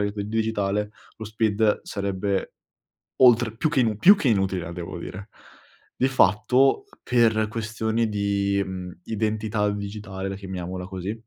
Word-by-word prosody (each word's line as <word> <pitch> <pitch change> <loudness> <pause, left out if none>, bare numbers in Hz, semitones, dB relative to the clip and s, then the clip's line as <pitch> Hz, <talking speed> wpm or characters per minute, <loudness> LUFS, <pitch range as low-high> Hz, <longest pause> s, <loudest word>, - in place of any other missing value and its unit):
il 100 0 -2
digitale, 105 -2 -1 0.2
lo 110 - -7
SPID 110 0 +1
sarebbe 100 0 -2 0.7
oltre 120 -3 +5
più 120 - 0
che 135 - +2
inu 110 -3 0
più 200 - +8
che 145 -11 0
inutile 95 -4 +1
la 85 - -7
devo 85 0 -6
dire. 95 +3 -8 0.7
Di 130 - +2
fatto 130 - +3 0.2
per 110 -3 +3
questioni 110 +1 -1
di, 100 -1 0
mhmm, 90 -1 -7
identità 110 -1 -1
digitale, 100 -1 -5
la 95 - -4
chiamiamola 95 -2 -6
così, 95 +2 -4
105 Hz, 140 wpm, -24 LUFS, 95-110 Hz, 0.7 s, più